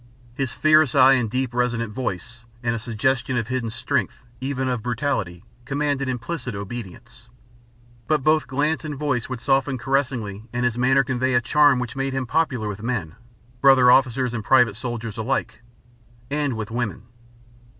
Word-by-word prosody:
His 130 -1 -2
fierce 155 -3 +4
eye 135 0 +7
and 125 -4 +1
deep, 130 +1 -2
resonant 120 -3 -1
voice, 115 -1 -5 0.2
and 115 0 +1
a 115 - -3
suggestion 125 +3 -1
of 115 -1 -2
hidden 130 -3 -2
strength, 125 +2 -2 0.2
even 130 0 -2
of 125 -3 -1
brutality, 115 -7 -2 0.2
commanded 140 0 -1
implicit 125 -1 -4
obedience. 115 +3 -8 0.8
But 155 -3 +1
both 155 +1 +3
glance 150 +5 0
and 150 -2 -4
voice 135 -5 -1
would 130 -3 -5
soften 135 0 +1
caressingly 125 -5 -2
and 120 0 -1
his 120 -2 +1
manner 130 +2 +3
convey 130 0 0
a - - +6
charm 145 +3 +4
which 125 -2 -4
made 135 0 -2
him 130 -1 -2
popular 130 -5 0
with 105 0 -5
men 110 -9 -3 0.5
brother 130 -2 +7
officers 130 -1 +3
and 110 -3 -3
private 125 -4 +4
soldiers 120 -1 -5
alike 115 0 -2 0.7
and 145 -5 -1
with 110 +1 -5
women. 115 -3 -3
125 Hz, 160 wpm, -23 LUFS, 115-135 Hz, 0.8 s, eye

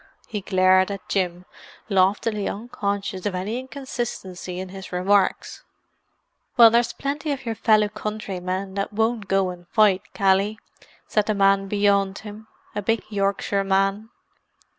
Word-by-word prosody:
He 210 -3 -4
glared 185 0 +4
at 200 -1 -6
Jim, 180 -2 -1 0.4
loftily 200 +1 +1
unconscious 200 -3 -3
of 195 - -2
any 205 +7 -2
inconsistency 240 -9 -5
in 185 0 -6
his 190 0 -9
remarks. 190 +2 +1 0.9
"Well, 230 -2 +9
there's 235 0 +3
plenty 290 +2 -3
of 270 -2 -4
your 230 - -1
fellow 215 -1 +3
countrymen 195 -3 -4
that 200 +2 -2
won't 220 0 0
go 195 -1 +1
and 175 -1 -12
fight, 205 -1 +2
Cally!" 195 +1 +2 0.5
said 210 -1 0
the 215 - +1
man 195 0 +3
beyond 200 -1 +2
him—a 210 -1 -9
big 225 +3 0
Yorkshireman. 195 0 0
200 Hz, 130 wpm, -23 LUFS, 190-215 Hz, 0.9 s, Well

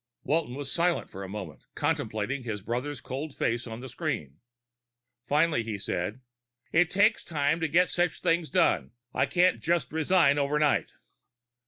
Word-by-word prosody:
Walton 150 -3 0
was 140 -1 -5
silent 175 0 +1
for 95 - -8
a 95 - -7
moment, 95 -7 -7
contemplating 110 +6 -1
his 110 -5 -5
brother's 125 +6 -3
cold 140 +3 -6
face 120 +1 0
on 115 +1 -7
the 130 - -7
screen. 75 - -4 0.9
Finally 150 -3 +3
he 110 -2 -4
said, 105 +4 -3 0.5
"It 165 +1 +4
takes 210 +4 +3
time 150 0 0
to 160 - 0
get 175 +4 +4
such 175 0 0
things 165 -1 +1
done. 180 - +2 0.2
I - - +2
can't 180 +1 +3
just 165 -6 0
resign 160 -2 +3
overnight." 145 +1 +1
145 Hz, 155 wpm, -28 LUFS, 120-165 Hz, 0.9 s, It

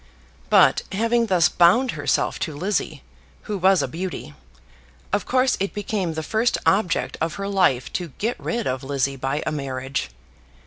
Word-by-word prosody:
But, - - +5
having 230 +3 +1
thus 180 -4 +4
bound 230 +10 +4
herself - - -1
to 155 -4 -3
Lizzie, 190 - -2 0.4
who 210 - -4
was 190 +1 +4
a - - -1
beauty, 165 - -6 0.8
of 205 -2 0
course 255 0 +2
it 195 +1 -2
became 195 -5 -2
the 160 - -3
first 225 +7 +1
object 195 -3 +1
of 160 0 -1
her 200 0 -4
life 180 -11 +1
to 175 - -2
get 230 +4 -2
rid 235 -2 -2
of 130 +1 -2
Lizzie 135 0 -1
by 135 +3 -2
a - - -1
marriage. 135 - -3
180 Hz, 165 wpm, -23 LUFS, 145-210 Hz, 0.8 s, But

